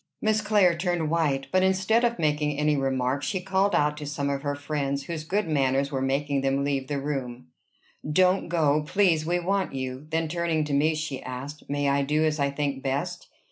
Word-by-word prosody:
Miss 215 0 +1
Clare 205 -5 +3
turned 170 -3 -1
white; 145 -5 +1
but, 185 - +3
instead 190 +5 +2
of 235 0 +1
making 150 -2 0
any 150 0 +2
remark, 135 0 0
she 190 +6 -2
called 190 +2 +1
out 150 0 +2
to 150 -1 -6
some 140 -1 -2
of 140 -1 -2
her 145 0 -2
friends 140 -1 -2
whose 165 -2 -5
good 195 +4 -1
manners 140 -2 +1
were 135 -2 -2
making 140 +1 0
them 135 +1 +1
leave 140 -2 -1
the 145 0 -2
room, 130 - -4 0.6
"Don't 185 +3 +3
go, 155 -3 +2
please; 160 -1 +2
we 175 +1 +1
want 190 0 -1
you." 130 +2 -5
Then 160 0 0
turning 165 -1 0
to 150 -1 -3
me, 155 +3 +3
she 155 -4 -4
asked, 135 +4 -8
"May 145 0 0
I 140 0 +2
do 150 +3 +1
as 155 -1 0
I 140 0 +2
think 140 -1 -2
best?" 135 +1 -3
150 Hz, 205 wpm, -26 LUFS, 140-170 Hz, 0.6 s, Clare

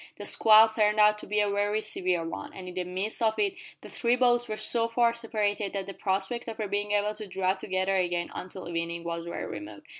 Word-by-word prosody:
The - - -7
squall 220 0 +7
turned 215 -1 +1
out 210 0 +5
to - - -10
be 210 0 +1
a 205 - +2
very 205 +1 +1
severe 180 -5 -1
one, - - -7
and 185 -1 -9
in 180 - -7
the 180 0 -2
midst 190 +6 -4
of 220 -1 +2
it 400 -2 +1 0.3
the - - -10
three 240 0 +1
boats 240 -1 +3
were 215 - -4
so 230 +2 +1
far 235 0 +2
separated 215 -3 -2
that 195 -1 -3
the 195 - -7
prospect 195 +6 -2
of 225 - -5
their 215 - -2
being 205 +1 -2
able 210 +1 +1
to 215 0 -8
draw 190 0 0
together 190 0 -1
again 175 -2 0
until 185 -1 -7
evening 170 0 -3
was 170 0 -4
very 170 - -4
remote. 310 - -8
205 Hz, 235 wpm, -28 LUFS, 185-220 Hz, 0.3 s, squall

